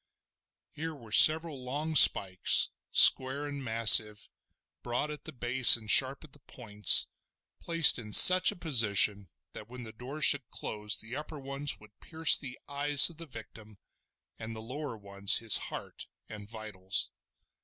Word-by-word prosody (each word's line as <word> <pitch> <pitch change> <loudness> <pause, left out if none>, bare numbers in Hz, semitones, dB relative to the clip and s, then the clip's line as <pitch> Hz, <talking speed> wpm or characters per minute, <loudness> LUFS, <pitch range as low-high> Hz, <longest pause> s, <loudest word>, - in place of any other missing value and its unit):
Here 160 +1 -11
were 115 -6 -19
several 155 +1 +2
long 150 +5 -9
spikes, 95 -8 +3 0.2
square 130 +3 +1
and 140 -1 -11
massive, 110 -2 +1 0.5
broad 125 +5 -8
at 150 -2 -14
the - - -8
base 120 -1 +2
and 110 -1 -6
sharp 135 +2 +2
at 150 -3 -21
the 145 - -17
points, 105 -6 0 0.5
placed 165 -6 +2
in 105 -2 -14
such 185 - +7
a - - -15
position 105 - -1 0.2
that 105 - -15
when 125 0 -14
the 110 - -14
door 130 +7 -13
should 145 -5 -2
close 105 0 -8
the 115 +3 -10
upper 150 +1 -12
ones 140 +1 -7
would 105 0 -24
pierce 160 0 0
the 130 -3 -6
eyes 145 +2 +1
of 160 - -23
the 165 0 -14
victim, 110 -4 -17 0.6
and 110 0 -12
the - - -12
lower 130 +2 -12
ones 100 0 -3
his 115 -2 -2
heart - - -13 0.2
and 105 -1 -15
vitals. 105 -4 -7
125 Hz, 155 wpm, -25 LUFS, 110-145 Hz, 0.6 s, such